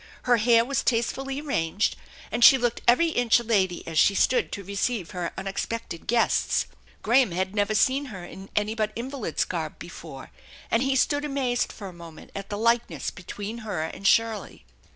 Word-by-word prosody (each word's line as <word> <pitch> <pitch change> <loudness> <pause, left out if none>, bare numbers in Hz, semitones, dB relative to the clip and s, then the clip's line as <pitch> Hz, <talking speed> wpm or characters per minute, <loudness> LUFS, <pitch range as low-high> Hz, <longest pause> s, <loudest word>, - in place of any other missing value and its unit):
Her 245 -1 +4
hair 230 +1 +4
was 275 +2 0
tastefully 265 +3 -1
arranged, 205 - 0 0.4
and 235 +1 0
she 265 - +9
looked 240 -2 -1
every 290 +8 +5
inch 245 -6 +3
a - - -6
lady 190 -6 0
as 160 -2 0
she 200 - +5
stood 250 - +2
to 200 - -5
receive 200 0 -2
her 175 -2 -3
unexpected 195 -1 -5
guests. 235 +1 +2 0.4
Graham 245 +1 +4
had 190 +2 -2
never 205 +1 0
seen 265 +6 +2
her 190 -8 -8
in 190 +2 -11
any 210 +1 +1
but 215 -1 -1
invalid's 245 - -2
garb 160 -4 -4
before, 160 -5 -10 0.4
and 230 - +3
he 270 0 +1
stood 285 +2 +2
amazed 270 -4 -1
for 200 - -8
a 185 - -9
moment 170 -2 -12
at 195 0 -7
the 205 - -3
likeness 235 +2 0
between 205 +5 -7
her 205 -8 -3
and 190 +5 -3
Shirley. 225 -2 +1
220 Hz, 180 wpm, -26 LUFS, 190-245 Hz, 0.4 s, she